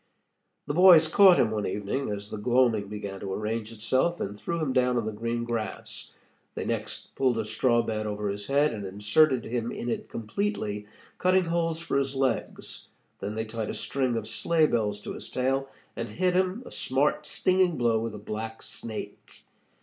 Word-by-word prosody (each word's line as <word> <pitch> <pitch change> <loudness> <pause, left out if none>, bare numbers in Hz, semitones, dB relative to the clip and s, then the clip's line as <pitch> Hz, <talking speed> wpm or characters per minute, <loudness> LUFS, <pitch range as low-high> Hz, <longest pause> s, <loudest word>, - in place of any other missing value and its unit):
The - - -2
boys 175 -2 +8
caught 190 +2 +7
him 110 - +3
one 105 -1 -1
evening 105 +8 -2
as 100 0 -5
the 110 - -4
gloaming 120 -2 +2
began 100 -1 -6
to 95 -1 -5
arrange 110 +2 -2
itself, 130 +10 0
and 100 +1 -3
threw 170 +10 -3
him 150 -5 -1
down 125 -1 +3
on 115 - 0
the 110 - -2
green 115 +2 -2
grass. 115 -4 -5 0.4
They - - -3
next - - -4
pulled 130 -3 +1
a 110 - -1
straw 120 +2 +2
bed 110 -1 -2
over 105 0 -2
his 100 0 -4
head, 140 0 +3
and 105 -2 -5
inserted 105 +8 +2
him 120 0 -2
in 120 - -4
it - - -3
completely, 110 - -3 0.3
cutting 185 0 +3
holes 165 -1 0
for 140 -4 0
his 135 0 -1
legs. 135 -3 -2 0.3
Then 105 +2 -4
they 110 0 -2
tied 110 -1 -4
a - - -3
string 130 -4 -1
of 110 -1 -4
sleigh 160 +7 +2
bells 105 -6 0
to - - -6
his - - -8
tail, 135 +1 0 0.3
and 115 0 -4
hit 180 0 +1
him 185 +6 +1
a - - -10
smart, 145 +3 0
stinging 185 -2 +2
blow 115 -2 +2
with 115 -1 -4
a - - -6
black 110 +2 -6
snake. 110 -2 -7
120 Hz, 190 wpm, -27 LUFS, 105-145 Hz, 0.4 s, boys